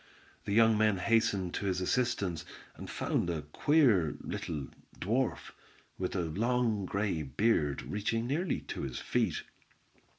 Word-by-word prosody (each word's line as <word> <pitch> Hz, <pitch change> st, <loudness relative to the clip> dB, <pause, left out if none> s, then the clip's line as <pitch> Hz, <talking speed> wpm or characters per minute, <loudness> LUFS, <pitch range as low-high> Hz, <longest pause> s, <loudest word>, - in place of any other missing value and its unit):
The -, -, -3 dB
young 110 Hz, 0 st, +5 dB
men 110 Hz, -2 st, +3 dB
hastened 100 Hz, -3 st, +1 dB
to 100 Hz, -, -2 dB
his 95 Hz, -1 st, 0 dB
assistance, 95 Hz, -5 st, 0 dB, 0.3 s
and -, -, -8 dB
found 85 Hz, -, -1 dB
a 80 Hz, -3 st, -2 dB
queer, 105 Hz, -, +3 dB
little 75 Hz, -5 st, -4 dB, 0.3 s
dwarf, 115 Hz, +6 st, -1 dB, 0.5 s
with 90 Hz, 0 st, -2 dB
a 90 Hz, -, +1 dB
long 110 Hz, +3 st, 0 dB
grey 100 Hz, -5 st, -1 dB
beard 75 Hz, -, +1 dB
reaching 115 Hz, +3 st, -1 dB
nearly 160 Hz, +8 st, -1 dB
to -, -, -6 dB
his 65 Hz, -3 st, -4 dB
feet. -, -, 0 dB
100 Hz, 135 wpm, -31 LUFS, 85-115 Hz, 0.5 s, young